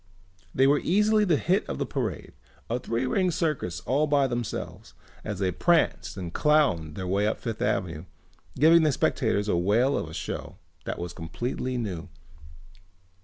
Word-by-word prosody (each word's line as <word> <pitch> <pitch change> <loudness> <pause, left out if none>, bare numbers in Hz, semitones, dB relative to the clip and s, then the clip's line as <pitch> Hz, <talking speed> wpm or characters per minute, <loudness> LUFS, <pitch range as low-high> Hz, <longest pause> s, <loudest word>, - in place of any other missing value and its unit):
They 130 - +3
were 145 +1 +4
easily 210 +3 +3
the 170 -6 +3
hit 185 +6 +1
of 65 - -3
the - - -1
parade, - - -4 0.4
a 120 - 0
three 120 +1 -2
ring 185 +8 +1
circus 155 - -2
all 145 +4 +1
by 145 -2 +3
themselves, 120 -3 -5 0.3
as 105 -3 -4
they 95 -1 0
pranced 170 - +1
and 90 -3 -6
clowned 115 - +2
their 95 - -4
way 100 +3 +1
up 110 - -1
Fifth 115 -3 -5
Avenue 80 -2 -1 0.5
giving 165 +4 +6
the 155 -1 +3
spectators 110 -5 0
a 100 - +1
whale 110 +10 +2
of 80 - -3
a - - -10
show - - -5 0.3
that - - -3
was 85 -1 -5
completely 120 +9 -4
new. 95 -7 -4
120 Hz, 170 wpm, -27 LUFS, 90-150 Hz, 0.5 s, giving